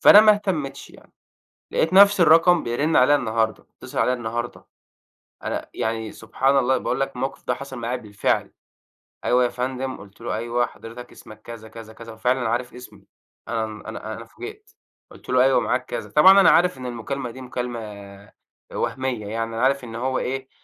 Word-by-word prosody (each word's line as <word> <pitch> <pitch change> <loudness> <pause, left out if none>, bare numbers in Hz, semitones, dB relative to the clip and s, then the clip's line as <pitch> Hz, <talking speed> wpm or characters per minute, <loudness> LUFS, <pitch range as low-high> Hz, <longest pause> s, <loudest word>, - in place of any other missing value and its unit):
فأنا 205 - +9
ما 215 0 +7
اهتميتش 185 -10 -3
يعني، - - -19 0.6
لقيت 165 - +1
نفس 200 -1 +7
الرقم 165 +1 +6
بيرن 145 +7 0
عليَّ 130 +3 +6
النهارده، 110 -4 -1
بيتصل - - -12
عليَّ 125 - +3
النهارده، 120 0 -5 0.8
أنا - - -4
يعني 110 -1 -3
سبحان 135 +5 0
الله 130 0 +3
باقول - - -2
لك 135 -1 -2
الموقف 135 +2 -4
ده 125 - +2
حصل 135 0 -8
معايا 120 +2 -2
بالفعل، 105 -4 -1 0.7
أيوه 125 0 +3
يا - - +2
فندم 130 +2 -4
قلت 100 +1 -15
له 115 - -3
أيوه 120 +2 0
حضرتك 120 +2 -11
اسمك 110 -1 -14
كذا 115 -1 -10
كذا 110 0 -11
كذا، 115 +1 -11
وفعلًا 125 +2 0
عارف 120 +2 -2
اسمي 125 0 -13 0.4
أنا 115 -1 -1 0.2
أنا 110 0 -6
أنا 115 - -9
فوجئت، 415 - -11 0.4
قلت - - -16
له 125 0 +4
أيوه 135 -1 +4
معاك - - -1
كذا، - - -5
طبعًا 190 +6 +7
أنا 180 - +7
عارف 175 -3 +3
إن 130 - -6
المكالمة 125 +2 -4
دي 130 +3 -11
مكالمة 105 -6 -7 0.4
وهمية 130 -5 -2
يعني، 115 +2 -2
أنا 115 - -2
عارف 135 0 +2
إن 115 -2 -9
هو 130 +2 -1
إيه 130 +1 -3
125 Hz, 175 wpm, -23 LUFS, 115-135 Hz, 0.8 s, فأنا